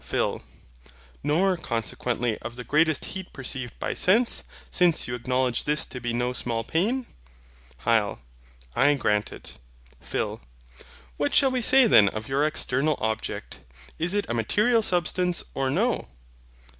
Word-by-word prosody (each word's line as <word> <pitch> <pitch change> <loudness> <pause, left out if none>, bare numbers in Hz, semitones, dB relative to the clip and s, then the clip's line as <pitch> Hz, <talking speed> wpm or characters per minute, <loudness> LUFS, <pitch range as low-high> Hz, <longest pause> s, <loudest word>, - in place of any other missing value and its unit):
PHIL. - - -1 0.8
Nor 185 +5 +2
consequently 120 -3 -2
of 115 +2 -7
the 125 - -7
greatest 155 +4 +2
heat 190 -1 -6
perceived 130 -2 -6
by - - -2
sense, 230 +6 +2 0.3
since 175 -3 +2
you 120 - -4
acknowledge 125 0 0
this 150 +1 0
to 125 - -8
be 120 0 -2
no 120 +1 -1
small 115 -2 -2
pain? 215 - 0 0.8
HYL. 110 -3 +2 0.6
I 145 +3 +4
grant 105 -6 0
it. - - -11 0.4
PHIL. - - -3 0.8
What 145 - 0
shall 270 -1 +5
we 255 -1 0
say 265 +2 +6
then 110 - +6
of 110 +1 -6
your 135 +2 +1
external 150 -1 +1
object; 110 -10 -3 0.4
is 175 +4 0
it 205 - +1
a - - -2
material 210 - +2
Substance, 180 -2 +1
or 135 -1 0
no? - - 0
135 Hz, 145 wpm, -26 LUFS, 120-180 Hz, 0.8 s, say